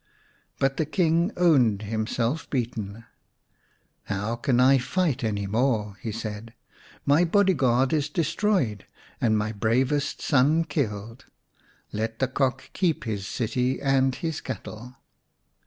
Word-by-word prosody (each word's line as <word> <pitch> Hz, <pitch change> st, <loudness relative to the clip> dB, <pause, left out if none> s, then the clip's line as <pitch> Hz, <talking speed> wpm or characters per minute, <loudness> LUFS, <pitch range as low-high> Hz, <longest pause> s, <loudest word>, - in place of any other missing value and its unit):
But 135 Hz, 0 st, +1 dB
the 155 Hz, -, 0 dB
King 170 Hz, +2 st, +2 dB
owned 130 Hz, -, +4 dB
himself 115 Hz, +6 st, -2 dB
beaten. 115 Hz, -4 st, -3 dB, 0.5 s
" -, -, -41 dB, 0.2 s
How 105 Hz, +3 st, -2 dB
can 120 Hz, +1 st, +1 dB
I 135 Hz, +1 st, +6 dB
fight 140 Hz, 0 st, 0 dB
any 105 Hz, -2 st, -1 dB
more? 110 Hz, -1 st, 0 dB
" -, -, -26 dB
he 110 Hz, -, -3 dB
said. 110 Hz, +1 st, -6 dB, 0.2 s
" -, -, -25 dB
My 145 Hz, +5 st, +4 dB
body 190 Hz, +3 st, +3 dB
guard 130 Hz, -2 st, +2 dB
is 150 Hz, -1 st, +1 dB
destroyed 165 Hz, -, 0 dB, 0.3 s
and 110 Hz, -2 st, +3 dB
my 105 Hz, 0 st, -1 dB
bravest 125 Hz, +7 st, 0 dB
son 145 Hz, +5 st, +3 dB
killed. 115 Hz, -, -4 dB, 0.7 s
Let 110 Hz, +1 st, -3 dB
the 130 Hz, -, +1 dB
Cock 130 Hz, 0 st, -1 dB
keep 175 Hz, -5 st, 0 dB
his 105 Hz, -3 st, -3 dB
city 125 Hz, +2 st, -1 dB
and 135 Hz, -2 st, +2 dB
his 160 Hz, -2 st, -3 dB
cattle." 125 Hz, -1 st, -7 dB
125 Hz, 140 wpm, -26 LUFS, 110-145 Hz, 0.7 s, I